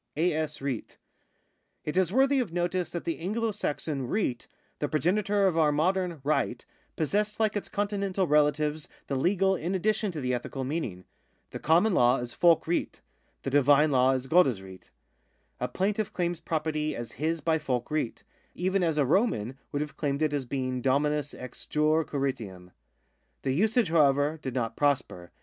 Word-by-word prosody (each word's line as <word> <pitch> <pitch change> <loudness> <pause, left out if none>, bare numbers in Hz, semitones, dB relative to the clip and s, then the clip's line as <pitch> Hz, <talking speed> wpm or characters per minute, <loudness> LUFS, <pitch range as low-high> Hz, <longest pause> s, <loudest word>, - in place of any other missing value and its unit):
A.S. 155 -3 0
RIHT. 135 -5 -4 0.4
— - - -47
It 150 - -3
is 185 -2 +2
worthy 270 +4 +3
of 235 -9 -2
notice 175 +1 -1
that 170 - -5
the 165 - -3
Anglo 220 +6 -1
Saxon 145 -8 -3
riht, 130 - -1 0.3
the 145 - -1
progenitor 200 +6 +1
of 170 -4 +2
our 155 -2 +4
modern 175 +1 0
right, 150 +2 0 0.3
possessed 210 +7 -1
like 215 -2 +1
its 205 - -3
Continental 200 -2 -1
relatives 150 0 +2 0.2
the - - -4
legal 190 +7 +2
in 180 +2 -2
addition 210 +2 0
to 160 - -5
the 125 -2 -1
ethical 125 +2 -4
meaning. 130 - -4 0.5
The - - -6
common 175 +7 +3
law 125 -3 +4
is 120 -1 -5
folc 170 -2 +4
rihtA 170 +1 -2 0.4
The - - -3
divine 145 +2 +5
law 130 0 +4
is 130 0 -2
godes 135 - +4
riht. 95 -1 -13 0.7
A - - -1
plaintiff 205 +2 -1
claims 175 -2 -2
property 155 -2 -2
as 120 -1 -6
" - - -12
his 165 +1 0
by 160 0 +1
folc 125 -5 -1
riht,^^ 150 -6 -2 0.3
3 - - -8
even 190 +1 +2
as 160 -3 +1
a 145 - +3
Roman 135 - +1
would 145 +1 -1
have 150 - -10
claimed 145 0 -1
it 155 -1 +1
as 140 -3 -1
being 130 0 -2
dominus 145 +2 +1
ex 125 -1 -9
jure 155 +1 +2
Quiritium. 115 -12 -4 0.7
The 135 - 0
usage, 215 - +2
however, 150 -1 +3
did 130 -2 -5
not 115 -3 -1
prosper. 130 -12 0
155 Hz, 175 wpm, -28 LUFS, 135-180 Hz, 0.7 s, divine